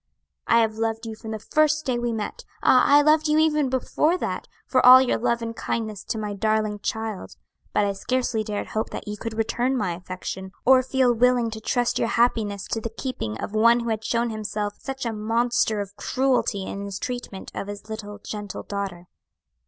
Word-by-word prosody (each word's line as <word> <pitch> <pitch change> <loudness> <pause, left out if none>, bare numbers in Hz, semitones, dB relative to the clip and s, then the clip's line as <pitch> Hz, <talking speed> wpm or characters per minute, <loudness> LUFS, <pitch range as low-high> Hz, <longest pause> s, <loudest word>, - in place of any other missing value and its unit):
I 230 - +5
have 220 -1 -1
loved 225 0 -1
you 220 -1 -5
from 220 0 -9
the 220 - -3
first 310 +7 +1
day 250 -2 0
we 240 0 -1
met! 230 - -4 0.2
ah, 255 - +6
I 290 +1 +6
loved 310 +1 +4
you 300 0 +3
even 305 -3 +3
before 300 +6 +1
that, - - -4 0.2
for 255 - +2
all 255 +1 +11
your 260 -1 +1
love 235 0 0
and 230 0 -4
kindness 215 -4 -3
to - - -3
my 210 -1 -3
darling 215 0 0
child; 220 -1 -4 0.4
but 205 - +2
I 200 - 0
scarcely 235 +2 -1
dared 210 -1 -4
hope 220 - -2
that - - -7
you 210 - -3
could 225 +1 -6
return 245 +4 0
my 200 -7 -1
affection, 185 +2 -6
or 260 +1 +7
feel 260 -1 +2
willing 240 0 +3
to 220 0 -7
trust 245 +2 0
your - - +1
happiness 220 -5 +1
to 225 - -1
the 230 - -3
keeping 215 - -5
of - - -5
one 230 +2 +5
who 235 - -3
had 220 -1 -2
shown 235 0 0
himself 210 -1 -3
such 270 -1 -5
a 230 - -1
monster 225 0 +1
of 200 0 -8
cruelty 255 -7 0
in 200 - -5
his 200 -1 -5
treatment 245 -6 -6
of - - -5
his 205 +1 -8
little 210 -2 -7
gentle 205 -1 -6
daughter. 195 -3 -5
225 Hz, 205 wpm, -24 LUFS, 210-250 Hz, 0.4 s, all